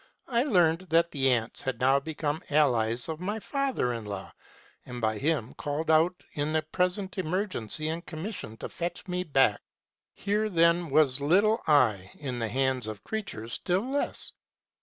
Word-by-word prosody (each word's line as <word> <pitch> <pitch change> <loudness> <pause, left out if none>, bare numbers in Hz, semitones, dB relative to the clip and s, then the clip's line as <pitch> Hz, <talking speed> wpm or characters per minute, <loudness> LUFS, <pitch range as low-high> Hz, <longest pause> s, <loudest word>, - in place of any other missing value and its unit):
I 235 -2 +2
learned 180 - +2
that 165 +1 +3
the 135 -2 +2
ants 115 -2 0
had 130 -3 -3
now 135 +2 +4
become 155 +1 -3
allies 120 -6 +2
of 160 0 -5
m}T 205 +4 -2
father 270 - -1
in 115 -1 -5
law, 100 -2 -6 0.5
and 125 -1 -7
by 110 -2 0
him 145 -6 0
been - - -14
called 150 +2 -2
out 165 +3 +3
in 150 +1 -1
the 155 0 +1
present 180 +4 -1
emergency, 165 - -2
and 165 +2 -3
commissioned 155 - -6
to - - -4
fetch 175 +2 -4
me 180 0 -1
back. 135 - +3 0.5
Here, 210 +2 0
then, 170 -2 +3
was 140 -2 +3
little 200 +9 +3
I 110 -11 +3
in 130 -4 -5
the 115 -2 -1
hands 130 -1 0
of 105 -2 -7
creatures 120 - -5
still 190 +6 0
less. 285 - -2
155 Hz, 170 wpm, -28 LUFS, 125-180 Hz, 0.5 s, now